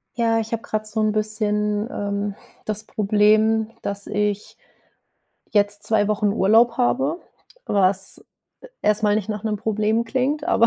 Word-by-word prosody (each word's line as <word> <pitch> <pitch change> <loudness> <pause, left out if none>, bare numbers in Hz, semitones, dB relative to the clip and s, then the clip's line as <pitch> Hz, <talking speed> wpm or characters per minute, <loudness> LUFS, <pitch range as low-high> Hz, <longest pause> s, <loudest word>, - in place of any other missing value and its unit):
Ja, 230 -1 +2
ich 225 0 -5
habe 230 - -2
grad 215 0 -3
so 215 +1 -2
‘n 215 - +2
bisschen, 210 0 0
ähm, 200 -3 -3 0.3
das 215 0 -2
Problem, 215 +1 +2
dass 200 0 -5
ich 210 0 -2 0.9
jetzt 205 0 +2
2 210 -1 +2
Wochen 210 0 +1
Urlaub 225 +3 +4
habe, 270 +6 0 0.4
was 195 - +1 0.6
erstmal 210 0 +2
nicht 210 -1 -2
nach 210 0 -4
'nem 215 -1 -1
Problem 215 +2 0
klingt, 265 +6 -1
aber 320 -9 +3
215 Hz, 140 wpm, -22 LUFS, 205-225 Hz, 0.9 s, Urlaub